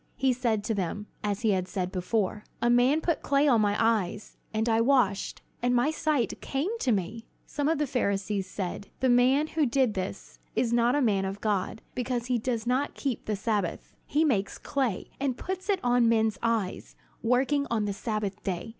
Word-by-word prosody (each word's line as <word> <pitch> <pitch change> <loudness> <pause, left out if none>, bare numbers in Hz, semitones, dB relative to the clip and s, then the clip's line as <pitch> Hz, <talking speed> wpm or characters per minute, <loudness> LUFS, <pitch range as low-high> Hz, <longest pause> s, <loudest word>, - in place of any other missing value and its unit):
He 265 -1 +2
said 235 -4 0
to 225 - -1
them, 205 +1 -3 0.2
as 205 +1 -1
he 220 -3 +3
had 185 -2 0
said 185 -3 -3
before: 205 +2 -1 0.2
"A 240 - +2
man 255 +6 +4
put 335 0 0
clay 280 +1 +2
on 235 -6 +5
my 205 -1 +2
eyes, 215 -3 0 0.2
and 220 +1 0
I 225 0 +3
washed, 230 -6 +1 0.2
and 245 +1 +2
my 245 +5 +3
sight 305 -6 0
came 310 +12 -2
to 255 - +1
me." 215 +3 -2 0.2
Some 290 +1 -1
of 325 - +2
the 295 - +1
Pharisees 200 -6 -1
said: 190 +1 -4
"The 260 - +2
man 255 +4 +4
who 310 -2 0
did 250 -2 +2
this 190 -1 -5 0.2
is 235 -2 +1
not 240 +2 +3
a 290 - +2
man 200 -5 +2
of 195 +1 -4
God, 205 0 -1
because 245 -1 -2
he 250 -1 +1
does 230 -1 -2
not 255 +4 0
keep 270 -5 -3
the 215 - -1
Sabbath. 205 -3 -2
He 305 +3 +2
makes 205 -9 0
clay, 265 -9 -2
and 270 -3 -1
puts 375 +2 -5
it 395 -2 +2
on 245 -1 +4
men's 220 -3 +2
eyes, 225 -5 -1 0.3
working 270 +4 +2
on 220 -3 0
the 205 - -1
Sabbath 210 -1 -3
day. 185 +3 -3
230 Hz, 200 wpm, -28 LUFS, 205-260 Hz, 0.3 s, on